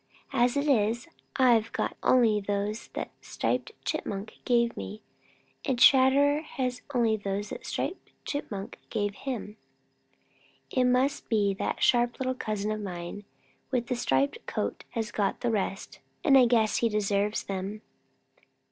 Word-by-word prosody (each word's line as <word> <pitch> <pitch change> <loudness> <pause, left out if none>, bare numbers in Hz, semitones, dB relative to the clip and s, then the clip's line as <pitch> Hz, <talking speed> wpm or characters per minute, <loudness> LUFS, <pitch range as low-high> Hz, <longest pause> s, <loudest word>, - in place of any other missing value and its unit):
As 250 +1 +3
it 285 +1 0
is, 235 0 +2 0.3
I've 235 -4 +4
got - - -1
only 230 -4 +4
those 205 +2 -2
that - - -4
Striped 460 - -2
Chipmunk 200 +2 -4
gave 235 -1 +2
me, 215 +2 -7 0.6
and 265 -3 0
Chatterer 275 +3 +6
has 255 -5 -3
only 235 -4 +2
those 205 0 -3
that - - -7
Striped 375 - -3 0.2
Chipmunk 205 -9 -5
gave 205 -2 -1
him. 220 -3 -5 1.1
It 255 -1 +2
must 255 +3 +1
be 205 -3 +2
that 190 - -2
that - - -4
sharp 240 -1 +3
little 255 -1 0
cousin 215 -4 -2
of 215 0 -3
mine 180 +1 -6 0.4
with 250 -3 0
the 250 - +1
striped 280 - 0
coat - - -3
has 230 -1 -3
got 205 -2 -1
the 240 - +1
rest, 195 -2 -3 0.2
and 275 - +5
I 255 -2 +7
guess 225 -3 +3
he 230 - +2
deserves 210 0 0
them." 195 +2 -5
230 Hz, 145 wpm, -28 LUFS, 205-255 Hz, 1.1 s, I